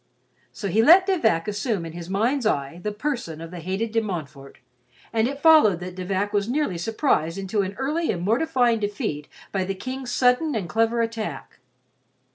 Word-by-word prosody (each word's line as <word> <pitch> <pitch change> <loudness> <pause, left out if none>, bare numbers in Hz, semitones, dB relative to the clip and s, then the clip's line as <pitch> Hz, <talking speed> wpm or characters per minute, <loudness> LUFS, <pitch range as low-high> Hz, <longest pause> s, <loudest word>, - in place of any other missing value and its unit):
So 200 - -5
he 210 +4 +3
let 345 +10 +7
De 385 -1 +2
Vac 165 - +1
assume 210 -2 -2
to 165 - -6
his 170 +1 -8
mind's 230 +6 +1
eye 140 -2 -2
the 210 - -2
person 215 - -4
of 165 0 -8
the 180 - -7
hated 190 +7 -3
De 225 0 +2
Montfort, 155 -9 -6 0.6
and 225 0 +2
it 275 +1 -5
followed 285 - +6
that 180 0 -6
De 185 0 -6
Vac 200 +2 -1
was 205 +1 0
nearly 255 - -1
surprised 175 - 0
into 195 +2 -1
an 195 0 -4
early 300 +6 -1
and 175 -2 -4
mortifying 240 - +2
defeat 200 -8 -3 0.2
by 190 -2 0
the 195 +1 -3
King's 255 +5 -6
sudden 250 +4 +2
and 200 -6 -2
clever 225 +5 +1
attack. 225 -1 -5
210 Hz, 190 wpm, -24 LUFS, 180-250 Hz, 0.6 s, let